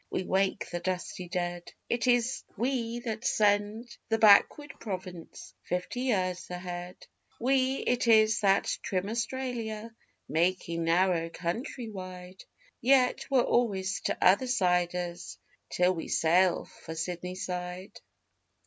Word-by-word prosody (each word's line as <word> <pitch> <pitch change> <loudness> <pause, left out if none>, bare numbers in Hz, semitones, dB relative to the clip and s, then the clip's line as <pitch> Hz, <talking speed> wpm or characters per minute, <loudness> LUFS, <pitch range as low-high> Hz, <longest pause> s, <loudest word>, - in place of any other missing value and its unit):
Yet - - -1
we - - -1
wake 190 0 0
the 175 - -2
dusty 180 0 -4
dead; 175 -1 -4
It 240 +1 -1
is 245 +1 +2
we 240 0 -1
that 225 -2 -4
send 210 +1 +1
the 225 - +2
backward 225 +7 +5
province 185 -5 -7
fifty 180 +7 -3
years 185 -8 -1
ahead; 180 0 -7 0.3
We 260 +1 +2
it 245 0 +1
is 220 -1 +5
that 195 -1 +3 0.2
'trim' 190 +1 -2
Australia 230 -2 -3 0.3
making 170 +1 0
narrow 170 0 +2
country 220 - -4
wide 185 -1 -9 0.4
Yet 255 0 +3
we're 265 -3 +4
always 200 -4 0
T'other 200 +8 +3
siders 180 -5 0 0.3
till 180 +1 +2
we 165 - -5
sail 175 +2 +3
for 160 - -10
Sydney 180 +2 -4
side. 180 +1 -5
190 Hz, 120 wpm, -29 LUFS, 180-230 Hz, 0.4 s, backward